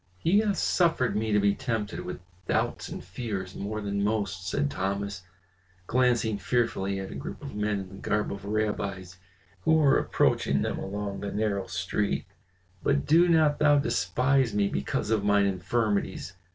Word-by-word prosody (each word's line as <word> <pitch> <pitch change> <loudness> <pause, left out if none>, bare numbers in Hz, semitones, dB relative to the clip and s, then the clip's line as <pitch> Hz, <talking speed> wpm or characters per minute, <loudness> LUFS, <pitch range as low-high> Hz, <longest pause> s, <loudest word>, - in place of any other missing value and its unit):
"He 175 - +3
hath 210 -3 +1
suffered 165 -8 +2
me 110 +1 0
to 105 - +4
be 100 0 +3
tempted 110 -4 -3
with - - -6 0.3
doubts - - -1
and - - -6
fears 100 -6 -5
more 105 +2 -4
than 100 -1 -1
most," 100 -3 -1
said 145 +9 0
Thomas, 100 -3 -2 0.6
glancing 120 -3 +2
fearfully 100 -5 0
at 95 - -6
a - - -7
group 70 - -6
of - - -7
men 105 -1 -1
in 95 - -8
the 95 - -11
garb 105 +1 -1
of 100 0 -8
rabbis 100 -4 -2 0.4
who 160 - +3
were 150 -4 +5
approaching 70 0 +1
them - - -2
along 100 0 -4
the 100 - -4
narrow 105 -2 -1
street. 100 +2 -1 0.6
"But 140 0 +1
do 165 +4 +5
not 155 -3 +4
thou 145 -1 +5
despise 125 +2 +1
me 100 -1 +3
because 70 +9 -2
of 110 -2 +2
mine 100 0 +4
infirmities. 100 -2 -1
105 Hz, 165 wpm, -28 LUFS, 100-125 Hz, 0.6 s, were